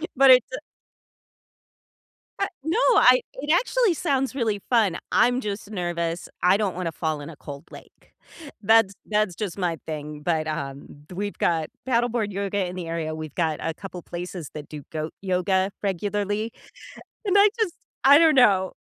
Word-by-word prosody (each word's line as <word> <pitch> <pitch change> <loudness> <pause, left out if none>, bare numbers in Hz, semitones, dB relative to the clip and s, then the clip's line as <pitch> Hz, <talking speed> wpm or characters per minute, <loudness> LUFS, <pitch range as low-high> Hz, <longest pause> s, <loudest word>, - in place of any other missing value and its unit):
But 270 0 +6
it's 255 -2 +7
a - - -3 1.8
But 395 - 0
no, 320 +7 0 0.2
I 255 0 +6
it 285 +3 -7
actually 460 +3 +3
sounds 270 -4 -1
really 220 -6 0
fun, 215 -8 +3
I'm 245 +1 +3
just 205 -2 -5
nervous, 175 -2 -3 0.2
I 185 +2 +5
don't 205 -4 -1
wanna 175 -2 -3
fall 155 -2 -3
in 145 - -8
a - - -10
cold 140 -1 -9
lake, - - -15 0.5
that's 220 -1 +4 0.2
that's 210 -4 +1
just 205 -3 -4
my 175 -4 -1
thing, 150 -1 -6
but, 160 0 0
um, 140 -3 -4 0.2
th 180 - -9
we've 205 +2 -4
got 160 -2 0 0.2
paddleboard 235 -3 +1
yoga 200 0 -1
in 180 - -7
the 180 -2 -5
area, 165 -1 -3
we've 155 -2 -7
got 160 -3 0
a 165 - -2
couple 185 0 -9
places 175 -2 -7
that 150 -1 -8
do 150 -2 -8
goat 155 0 -4
yoga 190 0 +1
regularly, 205 +3 -1 0.7
and 400 -1 +2
I 405 +1 +7
just, 385 -6 0 0.3
I 280 +2 +8
don't 320 -1 +5
know. 195 -8 +4
195 Hz, 170 wpm, -24 LUFS, 165-235 Hz, 1.8 s, I